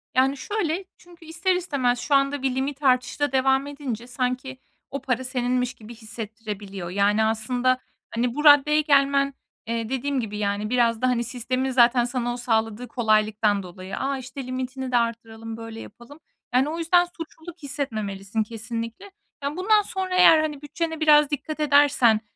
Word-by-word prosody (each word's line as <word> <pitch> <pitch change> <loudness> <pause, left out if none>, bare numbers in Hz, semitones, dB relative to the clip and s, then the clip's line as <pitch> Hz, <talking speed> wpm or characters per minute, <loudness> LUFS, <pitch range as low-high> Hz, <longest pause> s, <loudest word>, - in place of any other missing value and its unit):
Yani 265 +2 +3
şöyle: 385 -1 -2
Çünkü 345 -2 -17
ister 345 +3 0
istemez 270 -9 0
şu 290 - +1
anda 275 0 +2
bir 265 -1 0
limit 275 +2 -3
artışı 255 -1 +2
da 290 -1 +1
devam 265 +1 +2
edince 265 -5 -6
sanki 255 +1 -3 0.3
o 275 - -4
para 255 0 -1
seninmiş 250 -1 -1
gibi 225 +2 -12
hissettirebiliyor. 210 -4 -7
Yani, 200 +3 +2
aslında, 245 +4 +1 0.4
hani, 240 +2 0
bu 300 - -2
raddeye 300 +1 +7
gelmen, 280 -1 +3 0.3
eee, 230 -1 -2
dediğim 265 +1 -1
gibi, 210 -3 -4
yani, 205 +1 -1
biraz 235 -2 +2
da, 255 - +3
hani, 245 -2 +1
sistemin 255 +2 -2
zaten 245 0 +5
sana 240 -1 -2
o 245 - -6
sağladığı 225 0 -1
kolaylıktan 215 -3 +1
dolayı. 185 +1 -8
"A, 275 0 -1
işte, 260 0 -8
limitini 260 0 -4
de 245 - +3
arttıralım, 225 -1 -3
böyle 225 0 -8
yapalım." 240 +6 -13 0.3
Yani 260 +4 +3
o 325 - -4
yüzden 350 +1 +3
suçluluk 330 0 -10
hissetmemelisin 215 -7 -3
kesinlikle. 230 - -6 0.3
Yani, 285 +3 -3
bundan 420 +3 +4
sonra 380 -2 -3
eğer, 360 -3 +7
hani, 300 -2 -2
bütçene 320 +2 -4
biraz 300 -2 +5
dikkat 300 +2 -4
edersen 285 -6 +4
255 Hz, 165 wpm, -24 LUFS, 230-290 Hz, 0.4 s, raddeye